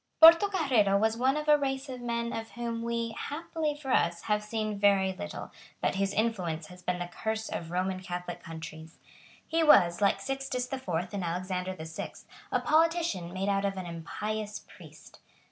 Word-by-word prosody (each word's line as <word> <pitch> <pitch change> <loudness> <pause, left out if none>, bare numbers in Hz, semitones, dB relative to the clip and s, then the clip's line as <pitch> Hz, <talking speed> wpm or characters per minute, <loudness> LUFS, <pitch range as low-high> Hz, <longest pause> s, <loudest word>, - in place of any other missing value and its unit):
Portocarrero 320 - +6
was 220 +1 +2
one 260 +4 +2
of 300 0 -3
a 300 -1 +6
race 270 0 -2
of 255 -2 -7
men 235 0 -2
of 225 0 -4
whom 235 -1 -3
we, 235 0 -1
happily 310 +1 -3
for 280 -3 -5
us, 170 -6 +2
have 210 -1 +1
seen 215 -1 -2
very 195 -2 +4
little, 205 +2 -7 0.3
but - - +1
whose 195 +1 0
influence 185 -8 -1
has 180 0 -12
been 180 0 -1
the 175 - -3
curse 220 +5 -3
of 165 - -4
Roman 185 +2 -1
Catholic 180 -1 -5
countries. 160 0 -9 0.5
He 330 +1 +1
was, 175 - +6
like 200 - +3
Sixtus 270 -2 -2
the 265 +1 -4
Fourth 180 -5 -3
and 200 -2 -2
Alexander 180 +2 -2
the 160 - -7
Sixth, 160 0 -7 0.3
a - - +2
politician 320 - +2
made 190 +2 -2
out 200 0 +1
of 195 -1 -1
an 185 - -4
impious 210 +6 -4
priest. - - -15
210 Hz, 180 wpm, -30 LUFS, 180-255 Hz, 0.5 s, Portocarrero